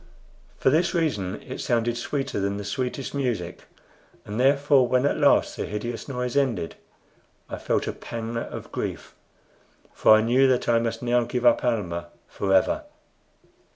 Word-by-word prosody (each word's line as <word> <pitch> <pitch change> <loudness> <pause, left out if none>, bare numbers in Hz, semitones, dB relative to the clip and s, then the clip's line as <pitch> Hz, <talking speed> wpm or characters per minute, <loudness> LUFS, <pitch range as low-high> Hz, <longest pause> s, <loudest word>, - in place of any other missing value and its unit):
For 130 - +3
this 170 +4 +2
reason 115 - -1
it - - -7
sounded 120 0 0
sweeter 135 0 -3
than 100 +1 -1
the 105 - -5
sweetest 125 +5 -3
music; 120 -11 -3 0.6
and 105 +2 -5
therefore, 140 0 +4
when 125 +2 +2
at - - +2
last - - +3
the - - -4
hideous 115 +3 -5
noise 125 -2 -3
ended, 130 -11 0 0.7
I - - -6
felt - - 0
a - - -3
pang 115 0 -6
of 115 - -6
grief, - - -5 0.8
for 110 - +6
I 110 - +4
knew 125 +4 +4
that 130 -2 +1
I 115 -1 +4
must 115 0 -3
now 120 0 +2
give 125 +1 -3
up 120 - +5
Almah 90 -8 -1 0.2
forever. 100 - +1
120 Hz, 155 wpm, -25 LUFS, 110-135 Hz, 0.8 s, for